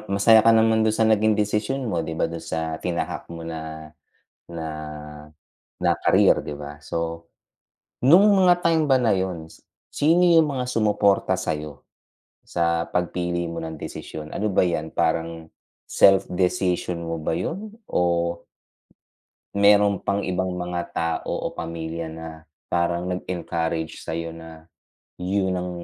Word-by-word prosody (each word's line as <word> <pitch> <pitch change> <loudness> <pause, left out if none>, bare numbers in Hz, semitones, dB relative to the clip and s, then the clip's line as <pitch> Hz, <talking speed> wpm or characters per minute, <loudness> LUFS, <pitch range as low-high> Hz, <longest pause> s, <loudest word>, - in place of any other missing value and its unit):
masaya 100 +3 +6
ka 115 - +7
naman 110 0 +4
dun 110 - +2
sa 110 0 +3
naging 110 0 +3
desisyon 105 +6 -1
mo, 85 -5 -1
'di 80 - -5
ba 80 - 0
dun 85 0 -6
sa 80 -1 -3
tinahak 85 -1 -3
mo 85 - -8
na 80 -1 -7 0.6
na 80 -2 -5 1.1
na - - +3 0.2
career, - - +5
'di - - -5
ba? 75 0 -8
So, 85 +1 -4 0.8
nung 180 +9 +7
mga 180 -2 +4
time 165 -2 +3
ba 135 - +5
na 115 -3 +3
yun, 90 -4 -3 0.4
sino 165 +4 +3
yung 165 -3 +5
mga 130 -2 -2
sumuporta 105 -5 +2
sayo 75 -6 -4 0.6
sa 85 -1 0
pagpili 85 -1 -1
mo 85 0 -5
ng 80 0 -6
desisyon? 75 -1 -7
Ano 105 +1 0
ba - - +3
yan 80 -3 -2
parang 80 -1 -1 0.4
self 95 0 +5
decision 90 -1 0
mo 85 0 -3
ba 75 - -2
yun 195 - -4 0.2
o - - 0 1.5
meron 100 0 +4
pang 100 +1 -1
ibang 95 0 -2
mga 90 -1 -3
tao 85 -1 -2
o - - -3
pamilya 80 0 -5
na 80 +1 -7 0.4
parang 85 +1 0
nag 90 - -4
encourage 85 -2 -3
sayo 85 0 -4
na 80 0 -12 0.4
yun 95 +1 -1
ang 90 0 -3
90 Hz, 145 wpm, -23 LUFS, 80-105 Hz, 1.5 s, ka